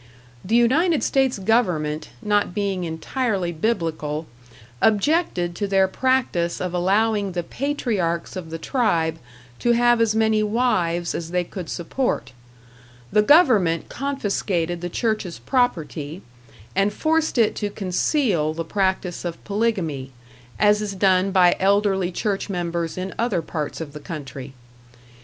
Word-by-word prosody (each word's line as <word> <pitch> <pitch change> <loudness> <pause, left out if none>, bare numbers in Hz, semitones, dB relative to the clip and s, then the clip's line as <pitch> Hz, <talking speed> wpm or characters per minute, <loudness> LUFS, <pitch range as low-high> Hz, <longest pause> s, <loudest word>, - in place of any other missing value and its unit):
The 220 +5 0
United 290 +8 +3
States 265 -3 +2
government, 180 -8 0
not 205 -3 +1
being 195 -3 -1
entirely 185 +3 -2
Biblical, 160 -5 -2 0.6
objected 215 - +2
to 205 - -1
their 195 -1 +3
practice 215 -7 0
of 180 -1 -3
allowing 200 +2 +1
the 175 -1 -2
patriarchs 210 - -2
of 180 -3 -6
the 165 - -4
tribe 165 - 0 0.4
to 240 - +3
have 240 0 +4
as 220 -1 +2
many 220 -1 +3
wives 185 -7 0
as 165 -1 -4
they 180 0 0
could 175 -1 -7
support; 210 - -2 0.8
the 210 - +5
government 215 - +4
confiscated 195 -10 -2
the 175 - -3
church's 215 -3 -2
property, 170 - -1 0.5
and 195 +2 +2
forced 315 +1 0
it 225 -3 +4
to 205 - -1
conceal 185 - 0
the 165 0 -3
practice 190 -1 -1
of 170 -2 -5
polygamy, 190 - -1 0.5
as 210 0 +4
is 205 -2 -3
done 190 0 +3
by 185 -2 +5
elderly 195 -1 +2
church 200 +3 -2
members 170 -3 -2
in 185 +1 -4
other 220 -8 0
parts 150 -2 -4
of 155 -3 -6
the 150 - -7
country. 140 -5 -8
190 Hz, 135 wpm, -23 LUFS, 170-225 Hz, 0.8 s, the